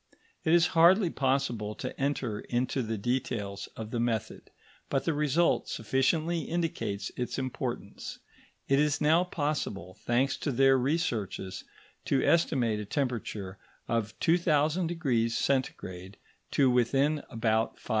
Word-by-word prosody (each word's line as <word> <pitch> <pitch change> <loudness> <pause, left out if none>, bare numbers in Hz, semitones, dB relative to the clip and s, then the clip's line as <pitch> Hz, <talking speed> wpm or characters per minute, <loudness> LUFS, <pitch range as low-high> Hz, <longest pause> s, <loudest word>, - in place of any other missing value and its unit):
It 160 - +1
is 170 0 +6
hardly 175 +2 +5
possible 120 -6 0
to - - -6
enter 135 -6 -1
into 125 +2 -1
the 110 -2 -3
details 105 -3 -2
of 110 0 -7
the 120 - -1
method, 115 -3 -2 0.4
but 135 -1 0
the 165 - +1
result 150 +3 +2
sufficiently 155 +9 +1
indicates 135 -13 -2
its 125 - -3
importance. 130 -2 -4 0.5
It 135 0 +3
is 150 -1 +2
now 160 +4 +4
possible, 145 - -3
thanks 130 +3 +1
to 145 - -2
their 135 +1 +5
researches, 125 - -1 0.4
to 135 - +2
estimate 125 -10 +2
a 105 - -4
temperature 105 -6 -3 0.3
of 110 -2 -1
2000° 155 -6 +2
C. 95 -8 -2 0.4
to 135 -3 +3
within 135 +5 +2
about 110 -1 0
5°. - - -16
130 Hz, 125 wpm, -29 LUFS, 110-150 Hz, 0.5 s, is